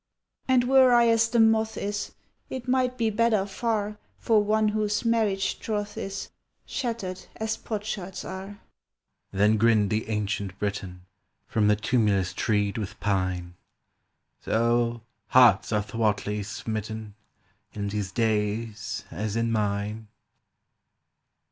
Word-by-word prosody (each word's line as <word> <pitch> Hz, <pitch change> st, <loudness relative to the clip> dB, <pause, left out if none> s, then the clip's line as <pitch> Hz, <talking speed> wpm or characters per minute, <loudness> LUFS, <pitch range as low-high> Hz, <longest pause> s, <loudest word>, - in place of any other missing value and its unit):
"And 260 Hz, -2 st, +4 dB
were 260 Hz, 0 st, +6 dB
I 235 Hz, -1 st, +5 dB
as 230 Hz, 0 st, +3 dB
the 235 Hz, -, +1 dB
moth 220 Hz, 0 st, +3 dB
is 205 Hz, 0 st, -3 dB, 0.4 s
It 260 Hz, -1 st, -6 dB
might 255 Hz, 0 st, +1 dB
be 225 Hz, -2 st, +1 dB
better 215 Hz, -2 st, +2 dB
far 210 Hz, 0 st, -2 dB, 0.2 s
For 220 Hz, -2 st, +3 dB
one 215 Hz, +1 st, +2 dB
whose 210 Hz, +1 st, -1 dB
marriage 215 Hz, -4 st, +1 dB
troth 210 Hz, -1 st, -3 dB
is 195 Hz, 0 st, -5 dB, 0.3 s
Shattered 215 Hz, -7 st, -4 dB
as 220 Hz, 0 st, -2 dB
potsherds 205 Hz, -4 st, -5 dB
are!" 190 Hz, +2 st, -7 dB, 0.7 s
Then 105 Hz, +3 st, +3 dB
grinned 110 Hz, -2 st, +3 dB
the 110 Hz, +1 st, -1 dB
Ancient 100 Hz, -2 st, -2 dB
Briton 95 Hz, -3 st, -4 dB, 0.4 s
From 105 Hz, -2 st, +1 dB
the 105 Hz, -, +5 dB
tumulus 105 Hz, -4 st, +1 dB
treed 105 Hz, 0 st, 0 dB
with 100 Hz, -3 st, -6 dB
pine: 95 Hz, -3 st, -1 dB, 0.9 s
"So, 120 Hz, +1 st, +1 dB, 0.3 s
hearts 120 Hz, -7 st, +5 dB
are 105 Hz, -1 st, +1 dB
thwartly 105 Hz, -1 st, -1 dB
smitten 110 Hz, +1 st, -5 dB, 0.6 s
In 100 Hz, -1 st, -3 dB
these 100 Hz, -2 st, -3 dB
days 110 Hz, 0 st, -1 dB
as 105 Hz, +4 st, -3 dB
in 115 Hz, 0 st, 0 dB
mine!" 105 Hz, 0 st, -1 dB
115 Hz, 125 wpm, -26 LUFS, -, 0.9 s, were